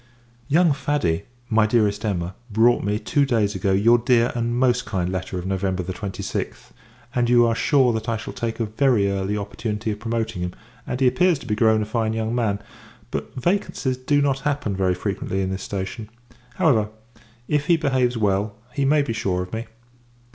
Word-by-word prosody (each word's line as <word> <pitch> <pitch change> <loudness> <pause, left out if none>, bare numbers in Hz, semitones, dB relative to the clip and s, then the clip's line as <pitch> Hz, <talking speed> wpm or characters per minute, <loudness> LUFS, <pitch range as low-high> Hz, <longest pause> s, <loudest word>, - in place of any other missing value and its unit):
Young 160 +2 +4
Faddy, 135 - -1 0.2
my 110 -2 +3
Dearest 105 -2 +1
Emma, 90 -4 -2 0.2
brought 115 +3 +3
me, 105 +1 0
two 140 +5 +1
days 110 -6 +1
ago, 95 +1 0
your 115 +5 +5
dear 120 0 +3
and 120 0 -1
most 125 -1 +2
kind 90 -3 -2
letter 95 0 -3
of 90 - -5
November 95 -1 -1
26th, 95 +2 -5 0.4
and 120 -1 +1
you 120 -1 +6
are 115 - +2
sure 125 +1 +3
that 110 +1 -3
I 115 - 0
shall 105 - -7
take 115 0 -3
a 115 - +1
very 110 -2 +2
early 100 +1 -1
opportunity 105 +1 -3
of 105 - -5
promoting 115 -4 -2
him; 90 0 -3 0.3
and 125 - -3
he 135 - +3
appears 175 +6 +3
to - - -12
be 105 - -1
grown 110 0 +3
a - - -4
fine 110 0 -1
young 110 0 -2
man, 115 -5 +1 0.5
but - - -5
vacancies 135 -3 0
do 145 +3 +1
not 135 -1 +1
happen 140 -8 -1
very 95 -1 +1
frequently 95 0 -2
in 95 - -2
this 95 0 -4
station. 100 +3 -5 0.5
However, 110 -9 +3 0.6
if 150 +1 0
he 170 -2 +5
behaves 130 -5 +1
well, 100 0 0 0.2
he 140 - 0
may 145 +1 +4
be 135 - -3
sure 95 -5 -1
of 90 - -11
me. 115 +1 -4
110 Hz, 190 wpm, -23 LUFS, 100-125 Hz, 0.6 s, you